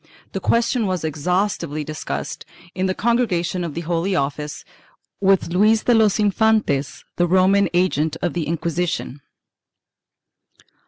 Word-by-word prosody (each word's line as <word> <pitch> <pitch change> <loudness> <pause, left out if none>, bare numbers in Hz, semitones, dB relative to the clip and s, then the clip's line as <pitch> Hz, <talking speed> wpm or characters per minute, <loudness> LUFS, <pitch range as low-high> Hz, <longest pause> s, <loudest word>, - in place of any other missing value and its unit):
The - - -3
question 230 -1 +1
was 185 -3 -2
exhaustively 160 0 -1
discussed, 70 - -5 0.3
in 185 0 -1
the 185 - -1
Congregation 200 -7 0
of 165 -4 -5
the 170 - -3
Holy 170 +3 -1
Office, 150 -1 -3 0.5
with 195 -3 +2
Luis 215 +5 +3
de 245 - +3
los 220 -2 +3
Infantes, 205 - +1
the 175 - +2
Roman 190 +3 +3
agent 160 -3 +1
of 175 - -2
the 170 -4 -2
Inqui 165 0 -2
sition. 175 -5 -2
180 Hz, 130 wpm, -21 LUFS, 155-200 Hz, 0.5 s, Luis